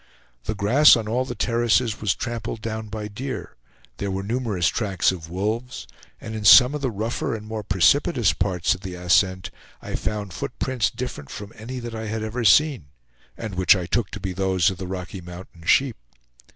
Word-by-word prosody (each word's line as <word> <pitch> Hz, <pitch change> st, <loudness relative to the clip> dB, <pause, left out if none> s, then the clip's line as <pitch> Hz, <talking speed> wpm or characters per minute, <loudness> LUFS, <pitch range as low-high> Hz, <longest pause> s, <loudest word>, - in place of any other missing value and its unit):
The 110 Hz, -, -2 dB
grass 120 Hz, +10 st, +6 dB
on 115 Hz, -3 st, -3 dB
all 125 Hz, +4 st, 0 dB
the 120 Hz, -, -6 dB
terraces 120 Hz, -1 st, +1 dB
was 100 Hz, -4 st, +1 dB
trampled 120 Hz, -2 st, -4 dB
down 110 Hz, -1 st, -4 dB
by 105 Hz, 0 st, -5 dB
deer; 130 Hz, +6 st, -6 dB, 0.4 s
there 100 Hz, -, -3 dB
were 95 Hz, 0 st, -3 dB
numerous 110 Hz, -6 st, -1 dB
tracks 100 Hz, -6 st, +1 dB
of 80 Hz, -3 st, -8 dB
wolves, 110 Hz, +7 st, -3 dB, 0.3 s
and 110 Hz, -, -7 dB
in 110 Hz, -1 st, -5 dB
some 125 Hz, +6 st, +8 dB
of 150 Hz, -, -4 dB
the 135 Hz, -, 0 dB
rougher 110 Hz, +2 st, -2 dB
and 105 Hz, -1 st, -8 dB
more 110 Hz, 0 st, -4 dB
precipitous 105 Hz, -, +3 dB
parts 90 Hz, -1 st, 0 dB
of -, -, -9 dB
the 95 Hz, -1 st, -6 dB
ascent, 90 Hz, +1 st, +1 dB, 0.3 s
I -, -, -8 dB
found 105 Hz, -3 st, -3 dB
foot -, -, -5 dB
prints 125 Hz, -5 st, 0 dB
different 125 Hz, -, -6 dB
from 100 Hz, +3 st, -8 dB
any 125 Hz, +4 st, -7 dB
that 120 Hz, -1 st, -6 dB
I 110 Hz, 0 st, -5 dB
had 110 Hz, 0 st, -3 dB
ever 115 Hz, +3 st, -3 dB
seen, 135 Hz, -, +4 dB, 0.5 s
and 110 Hz, -3 st, -6 dB
which 95 Hz, +1 st, +5 dB
I 90 Hz, -2 st, -3 dB
took 105 Hz, +3 st, -1 dB
to 110 Hz, -, -7 dB
be 95 Hz, -1 st, -4 dB
those 95 Hz, -1 st, +2 dB
of 90 Hz, -, -8 dB
the 95 Hz, -, -5 dB
Rocky 90 Hz, 0 st, -6 dB
Mountain 85 Hz, -1 st, -11 dB
sheep. 135 Hz, -3 st, +3 dB
105 Hz, 195 wpm, -23 LUFS, 95-120 Hz, 0.5 s, some